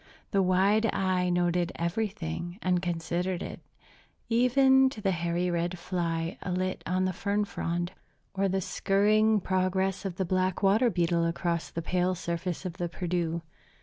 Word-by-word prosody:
The 195 - +3
wide 195 +4 +3
eye 185 -1 +1
noted 175 0 +1
everything, 175 - -3
and 180 -1 +2
considered 175 +1 -2
it, - - -7 0.7
even 265 +3 +5
to 245 - -9
the 195 -2 +1
hairy 170 0 -1
red 175 +1 -1
fly 170 -2 -2
alit 185 0 -2
on 185 +1 +1
the 185 - 0
fern 205 +3 0
frond, 175 -2 -3 0.4
or 195 0 +1
the 190 +1 0
skirring 210 +4 +3
progress 190 +1 0
of 190 -3 -4
the 190 - -1
black 185 +1 0
water 215 +6 +4
beetle 170 -3 +1
across 170 0 -1
the 165 - -5
pale 180 +1 +1
surface 170 +1 -3
of 180 -1 -5
the 175 -1 -2
Perdu. 170 -1 -2
180 Hz, 150 wpm, -28 LUFS, 175-195 Hz, 0.7 s, even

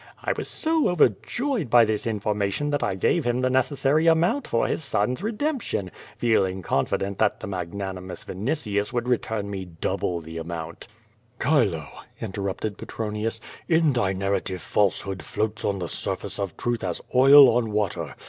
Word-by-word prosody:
I - - 0
was - - -5
so 320 -1 +1
over 175 -7 +5
joyed 245 - -2
by 120 0 +7
this 110 +1 -2
information 105 +5 -1
that 145 - 0
I 95 - 0
gave 150 - +1
him 120 0 0
the 130 0 +1
necessary 135 +4 +2
amount 170 - +3
for 115 - +1
his - - -2
son's 125 - 0
redemption, 225 - -2 0.3
feeling 95 -5 +1
confident 95 +8 -1
that - - +2
the - - -6
magnanimous 95 0 -5
Vinitius 105 - -2
would 120 0 -2
return 110 -4 -1
me 95 -1 -4
double 85 0 -2
the 80 0 -7
amount." 80 0 -6 0.5
"Chilo," 110 - +2 0.3
interrupted 100 +1 -4
Petronius, 110 +1 -3 0.3
"in 160 -3 +4
thy 120 -6 +1
narrative 95 -1 -2
falsehood 95 -1 0
floats 110 0 -3
on 100 - 0
the 90 -2 -3
surface - - -3
of 100 -4 -3
truth 120 -1 -2
as 90 -3 -2
oil 135 0 +8
on 120 -2 +1
water. 85 -9 -2
105 Hz, 160 wpm, -25 LUFS, 95-135 Hz, 0.5 s, oil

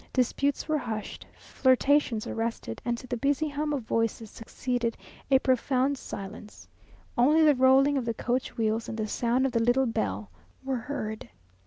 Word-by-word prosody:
Disputes 275 +3 0
were 310 -1 +1
hushed, 220 -5 -6
flirtations 260 -3 +2
arrested, 225 - -4
and 240 -1 -1
to 255 - -10
the 245 -1 -3
busy 285 +4 +1
hum 300 +1 -2
of 280 -5 -2
voices 225 -1 -1
succeeded 235 0 -3 0.3
a 270 - +6
profound 260 +1 +1
silence. 210 -3 -9 0.5
Only 295 +6 +4
the 300 -1 +6
rolling 270 +2 +4
of 250 - -4
the 230 -1 -2
coach 250 +3 -2
wheels 225 0 0
and 225 - -5
the 220 - -1
sound 240 +4 +1
of 270 - 0
the 230 -1 +1
little 245 +3 +3
bell 105 - -2 0.3
were 265 -1 -1
heard. 220 -4 -5
250 Hz, 165 wpm, -28 LUFS, 225-270 Hz, 0.5 s, a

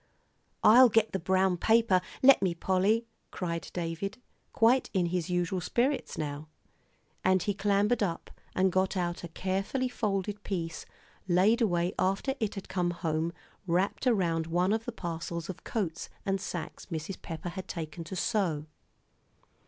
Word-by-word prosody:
"I'll 245 +4 +8
get 225 0 +3
the 190 - -1
brown 185 +1 +2
paper 220 -2 +4 0.2
let 275 -4 +8
me, 180 -3 +1
Polly," 195 +6 +2 0.2
cried 170 -3 -4
David, 175 +3 -3 0.3
quite 240 +3 +3
in 185 -3 +2
his 175 -1 -2
usual 180 +1 0
spirits 255 - 0
now. 150 0 -4 0.8
And 185 -1 +3
he 205 - 0
clambered 205 +3 +2
up, 170 -5 -2 0.2
and 190 0 +3
got 190 +2 +1
out 175 -1 -2
a - - -4
carefully 195 +9 -1
folded 205 -3 -2
piece 165 -5 -4 0.4
laid 195 +7 +4
away 175 -5 +1
after 195 +8 +1
it 215 -2 -1
had 195 - -7
come 180 -2 0
home 165 -1 -1 0.4
wrapped 185 +8 +1
around 170 -8 +2
one 180 +4 +2
of 225 +1 -1
the 245 - -3
parcels 170 -3 -4
of 180 - -14
coats 180 -8 -3 0.2
and 195 -1 0
sacks 175 -4 -6
Mrs. 165 +2 -5
Pepper 165 +1 -5
had 185 +2 -7
taken 165 0 -5
to 190 - -6
sew. 180 -8 0
185 Hz, 155 wpm, -30 LUFS, 170-205 Hz, 0.8 s, I'll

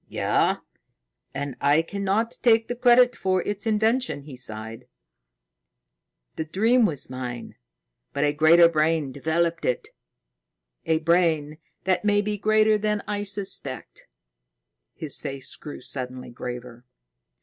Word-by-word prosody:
"Yes. - - +1 0.7
And 140 -1 -4
I 145 +3 +4
cannot 200 +5 -1
take 225 -2 +4
the 245 - -3
credit 245 0 +5
for 185 -1 0
its 205 +1 -4
invention." 220 - +1
He 140 -2 -10
sighed. 115 0 -8 1.5
"The - - -1
dream 225 +8 +3
was 145 -5 -4
mine, 125 -2 -6 0.6
but - - -1
a 145 0 +2
greater 160 +3 +6
brain 155 -3 +1
developed 165 +4 -1
it 125 - -1 1.0
a 160 - +3
brain 160 -2 +1 0.2
that 185 +1 +1
may 205 0 +2
be 210 0 -2
greater 215 +1 +3
than 210 0 -1
I 205 -1 -2
suspect." 200 -1 -5 0.9
His 155 -3 -2
face 135 -2 -5
grew 150 - -9
suddenly 125 -1 -5
graver. 120 0 -7
165 Hz, 125 wpm, -25 LUFS, 140-210 Hz, 1.5 s, greater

